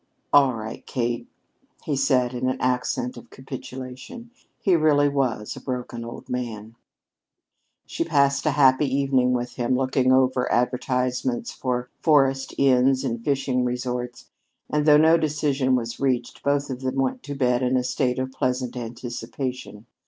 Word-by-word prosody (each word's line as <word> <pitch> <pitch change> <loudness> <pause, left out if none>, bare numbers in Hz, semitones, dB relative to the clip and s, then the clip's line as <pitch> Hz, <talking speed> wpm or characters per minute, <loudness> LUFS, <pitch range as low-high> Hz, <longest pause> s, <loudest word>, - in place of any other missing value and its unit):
"All 140 -3 +6
right, 110 0 -7
Kate," 120 -2 -2 0.6
he 150 - -1
said 130 -2 +2
with 125 - -5
an 130 - -1
accent 125 0 -1
of 120 0 -12
capitulation. 130 - -9 0.3
He 190 -3 +3
really 150 -3 +4
was 130 -7 -1
a - - -10
broken 125 -2 -5
old 115 0 -9
man. 115 -3 -5 1.1
She - - -2
passed 140 -3 +2
a 150 -1 +1
happy 135 0 +5
evening 135 -2 +2
with 120 0 -3
him 120 +1 +1
looking 130 0 +2
over 130 -1 +2
advertisements 125 - -1
of 125 -1 -1
forest 135 -4 +2
inns 130 0 +3
and 115 0 -3
fishing 135 -2 0
resorts, 125 0 -4 0.4
and 150 0 +1
though 150 -1 +8
no 160 +2 +6
decision 145 -4 +1
was 115 -2 -3
reached, 125 -3 -1
both 140 0 0
of 130 0 -5
them 130 0 -2
went 135 -1 -1
to 145 +1 -6
bed 125 -2 +1
in 130 0 +2
a 125 - 0
state 125 0 0
of 130 0 -2
pleasant 125 -1 -2
anticipation. 120 -1 -6
130 Hz, 150 wpm, -24 LUFS, 125-140 Hz, 1.1 s, though